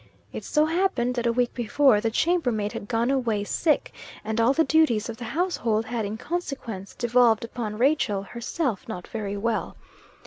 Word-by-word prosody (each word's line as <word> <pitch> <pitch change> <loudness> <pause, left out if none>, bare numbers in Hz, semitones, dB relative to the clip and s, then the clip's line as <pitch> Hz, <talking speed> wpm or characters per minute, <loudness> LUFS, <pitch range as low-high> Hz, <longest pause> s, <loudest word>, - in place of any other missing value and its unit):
It - - -5
so 300 0 +2
happened 320 -7 +1
that 240 -1 -1
a - - +3
week 245 0 0
before, 240 -1 +3
the 225 - +1
chambermaid 245 -8 +1
had 205 - -6
gone 235 +2 +1
away, 235 -6 0
sick, 305 +8 0 0.3
and 220 +1 0
all 230 +3 +4
the 320 +4 +3
duties 275 -10 +2
of 225 - -6
the 240 - -7
household 240 -6 0
had 225 -1 -2
in 210 +2 -4
consequence 260 - -5
devolved 240 -2 +3
upon 225 -2 -5
Rachel, 240 -6 +2
herself 235 - -3
not 180 -6 -6
very 205 -3 -4
well. 225 +2 -2
235 Hz, 175 wpm, -25 LUFS, 220-275 Hz, 0.3 s, all